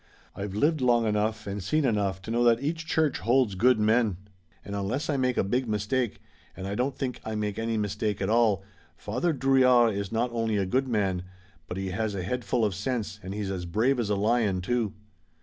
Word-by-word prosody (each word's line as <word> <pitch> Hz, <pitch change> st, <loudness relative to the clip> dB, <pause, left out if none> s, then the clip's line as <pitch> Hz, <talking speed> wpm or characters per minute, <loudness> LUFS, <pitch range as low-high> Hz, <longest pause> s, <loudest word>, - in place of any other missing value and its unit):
I've 100 Hz, 0 st, -5 dB
lived 150 Hz, +6 st, +2 dB
long 120 Hz, -2 st, +3 dB
enough 105 Hz, 0 st, 0 dB
and 100 Hz, 0 st, -4 dB
seen 150 Hz, +11 st, +1 dB
enough 100 Hz, -5 st, 0 dB
to 110 Hz, -, -5 dB
know 120 Hz, +1 st, +2 dB
that 115 Hz, -1 st, +5 dB
each 160 Hz, +4 st, -3 dB
church 155 Hz, -3 st, +1 dB
holds 120 Hz, -2 st, +2 dB
good 115 Hz, +5 st, +3 dB
men, 110 Hz, -2 st, +2 dB, 0.5 s
and 100 Hz, -, -5 dB
unless 110 Hz, +10 st, -2 dB
I -, -, 0 dB
make 130 Hz, -2 st, 0 dB
a -, -, +3 dB
big 125 Hz, +6 st, 0 dB
mistake, 105 Hz, +3 st, -1 dB, 0.4 s
and 95 Hz, -, -6 dB
I 100 Hz, -, -3 dB
don't 130 Hz, +5 st, -1 dB
think 130 Hz, -3 st, -3 dB
I 110 Hz, 0 st, -4 dB
make 105 Hz, -1 st, -2 dB
any 115 Hz, 0 st, -1 dB
mistake 105 Hz, 0 st, -1 dB
at 95 Hz, -, -1 dB
all, 110 Hz, -3 st, +3 dB, 0.3 s
Father 125 Hz, -, -1 dB
Drouillard 130 Hz, -4 st, +4 dB
is 100 Hz, -1 st, -4 dB
not 115 Hz, +2 st, 0 dB
only 115 Hz, -2 st, 0 dB
a 100 Hz, -, +1 dB
good 130 Hz, +8 st, 0 dB
man, 100 Hz, -6 st, 0 dB, 0.5 s
but 90 Hz, -, -5 dB
he 95 Hz, -1 st, -3 dB
has 105 Hz, +1 st, -2 dB
a 95 Hz, -, -3 dB
head 125 Hz, +7 st, -2 dB
full 110 Hz, +2 st, +1 dB
of 105 Hz, -, 0 dB
sense 110 Hz, +1 st, -3 dB
and 95 Hz, +2 st, -6 dB
he's 105 Hz, -2 st, -3 dB
as 90 Hz, -2 st, -4 dB
brave 120 Hz, +9 st, +1 dB
as 110 Hz, -3 st, -1 dB
a 105 Hz, -, +2 dB
lion, 105 Hz, -2 st, +1 dB
too." 115 Hz, +1 st, -1 dB
110 Hz, 220 wpm, -27 LUFS, 100-125 Hz, 0.5 s, that